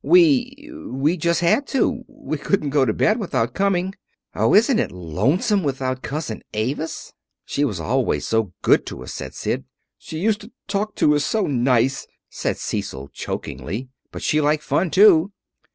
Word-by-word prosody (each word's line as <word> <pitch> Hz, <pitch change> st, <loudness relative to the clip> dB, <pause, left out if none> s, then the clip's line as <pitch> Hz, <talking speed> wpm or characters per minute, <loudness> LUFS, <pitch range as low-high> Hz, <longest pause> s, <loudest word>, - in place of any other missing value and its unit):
"We 290 Hz, -5 st, +4 dB, 0.2 s
we 140 Hz, +6 st, 0 dB
just 170 Hz, 0 st, 0 dB
had 175 Hz, +12 st, +2 dB
to. 255 Hz, -2 st, 0 dB
We 270 Hz, -, -6 dB
couldn't 150 Hz, -2 st, 0 dB
go 140 Hz, -2 st, +3 dB
to 110 Hz, -, +1 dB
bed 215 Hz, -, +2 dB
without 130 Hz, -, -1 dB
coming. 190 Hz, -1 st, 0 dB, 0.4 s
Oh, -, -, +3 dB
isn't 230 Hz, +3 st, +5 dB
it -, -, -1 dB
lonesome 110 Hz, -, 0 dB
without 130 Hz, -4 st, -2 dB
Cousin 145 Hz, -7 st, -4 dB
Avis?" 135 Hz, +9 st, -3 dB, 0.3 s
"She 145 Hz, -, -1 dB
was 105 Hz, -11 st, -1 dB
always 80 Hz, -, 0 dB
so 110 Hz, -4 st, 0 dB
good -, -, +4 dB
to -, -, -7 dB
us," -, -, -7 dB
said -, -, -7 dB
Sid. -, -, -2 dB, 0.4 s
"She 160 Hz, -, -7 dB
used 210 Hz, +5 st, +1 dB
to 215 Hz, +3 st, -12 dB, 0.2 s
talk 210 Hz, +1 st, -2 dB
to 150 Hz, -, +4 dB
us 145 Hz, -, +1 dB
so 215 Hz, +5 st, 0 dB
nice," 130 Hz, -2 st, +1 dB, 0.2 s
said -, -, -2 dB
Cecil 70 Hz, +1 st, -4 dB
chokily. 95 Hz, -, -5 dB, 0.2 s
"But -, -, -7 dB
she 155 Hz, 0 st, +2 dB
liked 150 Hz, +1 st, +1 dB
fun, 180 Hz, -, +1 dB
too." 195 Hz, 0 st, +5 dB
155 Hz, 170 wpm, -22 LUFS, 130-205 Hz, 0.4 s, isn't